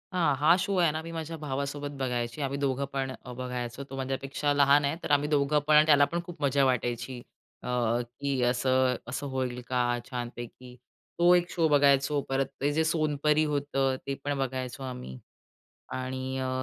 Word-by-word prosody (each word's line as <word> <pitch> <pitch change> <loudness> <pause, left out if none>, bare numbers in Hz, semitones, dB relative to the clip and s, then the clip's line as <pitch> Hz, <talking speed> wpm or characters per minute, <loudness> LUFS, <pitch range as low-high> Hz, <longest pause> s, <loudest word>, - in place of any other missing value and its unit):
हां, 165 -6 +2
हा, 155 +5 +5
शो 200 - -1
आहे 170 -3 +4
ना, 155 +1 -3
मी 165 +1 -8
माझ्या 165 0 -5
भावासोबत 140 0 -3
बघायचे. 120 0 -2
आम्ही 140 0 -2
दोघं 140 -1 0
पण 135 -1 -1
अ, 130 -1 -10
बघायचो. 125 0 -5
तो 135 - -7
माझ्यापेक्षा 135 +2 -2
लहान 140 0 +5
आहे, 140 +3 0
तर - - -3
आम्ही 145 0 +3
दोघं 150 0 +2
पण 150 0 +7
त्याला 145 -2 +6
पण 170 +4 -3
खूप 170 -3 -10
मजा 140 0 +3
वाटायची 125 0 -1 0.5
अ, - - -6 0.5
की 140 -2 -1
असं 130 +1 +2
असं 135 +3 -4
होईल 130 -2 -3
का 125 0 0 0.3
छानपैकी. 125 0 -7 0.4
तो 175 +1 +6
एक 175 0 +1
शो 165 -2 +2
बघायचो. 140 0 +4
परत 135 0 +1 0.2
ते 145 +1 +2
जे 160 +2 +2
सोनपरी 155 -1 +2
होतं, 140 -2 0
ते 140 - -1
पण 145 -1 -1
बघायचो 130 -1 -3
आम्ही 125 - -7 0.8
आणि 130 +1 -4
अ, 130 0 -2
140 Hz, 175 wpm, -28 LUFS, 130-150 Hz, 0.8 s, पण